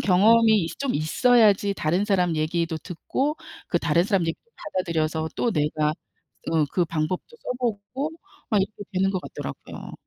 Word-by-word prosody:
경험이 215 +1 +5
있 165 - -7
좀 275 -2 -1
있어야지 205 - +4
다른 175 +5 +1
사람 180 -5 +2
얘기도 165 +1 0
듣고 265 - -2 0.3
그 - - +2
다른 170 - +2
사람 195 -2 +2
얘기도 165 - -5
받아들여서 160 -3 -2
또 240 - +1
내가 150 0 +1 0.6
응 160 -2 +3
그 180 - +2
방법도 165 - -3
써 250 - -4
보고 245 +5 -2 0.4
막 210 -3 +4
이렇게 205 +1 -6
되는 195 +1 +2
것 185 - -2
같더라고요. - - -8
185 Hz, 320 characters per minute, -25 LUFS, 165-220 Hz, 0.6 s, 경험이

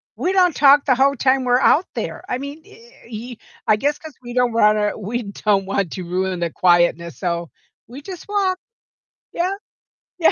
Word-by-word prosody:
we 365 - -1
don't 365 -4 +3
talk 285 0 +5
the 260 - +3
whole 275 +2 +3
time 260 +1 +2
we're 250 0 +3
out 310 +6 +4
there. - - -5
I 250 - -1
mean, 280 +4 -8
u - - -20
uh, 235 0 -19
he 235 +1 -8 0.3
I 215 - +5
guess 290 +7 -1
'cause 315 -3 -11
we 240 0 -8
don't 250 -1 +1
wanna 210 -2 +2
we 225 +4 -4
don't 200 -1 0
want 195 -3 -2
to 185 - -5
ruin 185 +1 -2
the 170 -1 -1
quietness, 175 -4 +2
so 170 -2 -3 0.4
we 250 +5 -10
just 360 +2 -9
walk. 395 -3 0 0.8
Yeah. 360 +3 -1 0.6
Yeah, 335 - +4
240 Hz, 190 wpm, -20 LUFS, 195-285 Hz, 0.8 s, talk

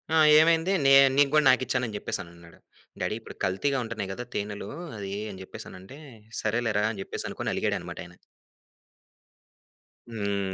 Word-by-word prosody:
"ఆ! - - +5 0.2
ఏమైంది? 165 +3 +3
నే 135 - +7 0.2
నీకు 145 -1 +5
గూడా 155 -1 +4
నాకిచ్చాను" 130 -1 +2
అని 110 - -7
జెప్పేసినన్నాడు. 85 -4 -7 0.4
"డ్యాడీ - - -1
ఇప్పుడు 115 - -12
కల్తీగా 135 +10 0
ఉంటున్నాయి 110 -4 -5
గదా 120 - -6
తేనెలు, 100 0 -4 0.3
అయి" 100 0 -4
అని 95 - -10
జెప్పేసనంటే, 95 +5 -11 0.4
"సరేలేరా!" 110 -1 0
అని 105 - -8
జెప్పేసి - - -4
అనుకోని, - - -3
అలిగాడనమాట - - -2
అయన. 90 0 -15 2.0
హ్మ్. 100 -3 -2
105 Hz, 135 wpm, -27 LUFS, 95-130 Hz, 2.0 s, నే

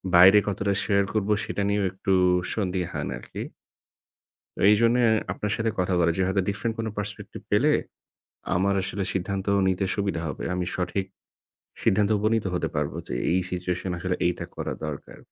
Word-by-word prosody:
বাইরে 95 +4 +9
কতটা 100 0 0
share 100 -1 +2
করবো 105 -1 +1
সেটা - - -3
নিয়েও 100 -1 +1
একটু 95 +1 -3 0.4
সন্দিহান 90 -4 -2
আরকি। - - -10 1.3
এইজন্য 115 +3 +4 0.4
আপনার 105 - -3
সাথে 115 -1 0
কথা 90 +1 +1
বলা 85 -1 +3
যে - - +1
হয়তো 95 +1 +1
different 110 +3 -2
কোন 115 - -1
perspective 105 0 -6
পেলে - - +4 0.8
আমার 100 +2 +2
আসলে 95 +1 -2
সিদ্ধান্ত 95 +1 -2 0.2
নিতে 95 +1 0
সুবিধা 100 -5 -1
হবে। 70 - -5
আমি 90 0 -1
সঠিক 90 +2 -1 0.8
সিদ্ধান্তে 105 +2 +3
উপনীত 110 +2 +2
নিতে 110 - -1
হতে 90 - 0
পারবো - - -1
যে - - -4 0.2
এই 90 - +3
situation 90 +1 -2
এ - - -2
আসলে 90 0 -1
এইটা 90 - -2
করা - - -3
দরকার। 75 -2 -7
95 Hz, 160 wpm, -26 LUFS, 90-105 Hz, 1.3 s, বাইরে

